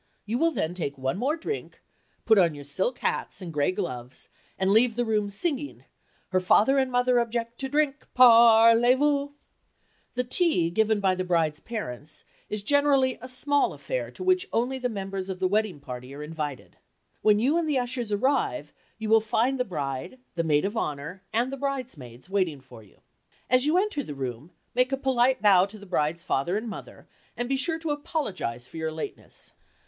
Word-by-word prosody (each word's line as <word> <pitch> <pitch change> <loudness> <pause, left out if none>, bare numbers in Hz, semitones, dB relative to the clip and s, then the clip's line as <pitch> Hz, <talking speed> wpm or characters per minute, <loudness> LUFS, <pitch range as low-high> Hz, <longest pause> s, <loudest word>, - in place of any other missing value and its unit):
You 225 +4 -2
will 330 - +4
all - - +1
then 170 - -2
take 145 -6 -4
one 130 +7 -2
more 285 +7 0
drink, 420 +6 -5 0.5
put 220 -2 +5
on 170 -4 +3
your 145 - -9
silk 185 - -1
hats - - -2
and 175 -4 -7
gray 145 +3 +1
gloves, 125 -7 -5 0.3
and 190 0 +1
leave 225 +2 +4
the 240 0 0
room 210 -2 0
singing, 285 - -3 0.4
"Her 185 - +2
father 220 +9 +4
and 265 -1 0
mother 245 0 +3
object 235 0 -3
to 270 - -3
drink—parlez 240 -4 +5
vous." 285 0 +1 0.8
The 250 - 0
tea 250 - +1
given 220 +2 +2
by 190 -1 +3
the 185 0 -2
bride's 165 -4 +1
parents 155 - -6 0.2
is 210 -1 -3
generally 275 0 +3
a 255 - -7
small 285 +3 +1
affair - - -4
to - - -8
which 370 0 +2
only 255 +3 0
the 250 -1 -1
members 195 -3 -5
of 190 - -3
the 185 0 +1
wedding 205 -4 0
party 125 0 -8
are 150 - -7
invited. 150 -3 -6 0.4
When 210 -1 +4
you 260 +8 +2
and 325 -2 -1
the 290 - +1
ushers 245 -3 -2
arrive, 205 - 0 0.2
you 220 0 -5
will 220 0 +5
find 235 +5 0
the - - +3
bride, 145 - -4 0.2
the 170 - -1
maid 150 +1 +2
of 205 +3 -3
honor 155 0 -4
and 240 +4 0
the - - -4
bridesmaids 250 - -5
waiting 185 -7 0
for 130 -3 -14
you. 105 - -22 0.5
As 255 +2 +4
you 320 +4 +3
enter 395 -6 0
the 150 - -7
room, 130 +2 -5 0.2
make 250 +2 +2
a 270 - 0
polite 260 -2 +2
bow 195 -2 +6
to 210 +2 -11
the 200 - -12
bride's 170 -2 -1
father 175 +3 0
and 225 +2 -4
mother, 215 - -9 0.3
and 240 - -2
be 270 - 0
sure 320 +4 +1
to 325 -2 -3
apologize 215 - -3
for 125 - -12
your 160 0 -2
lateness. 155 0 -7
220 Hz, 195 wpm, -26 LUFS, 165-260 Hz, 0.8 s, bow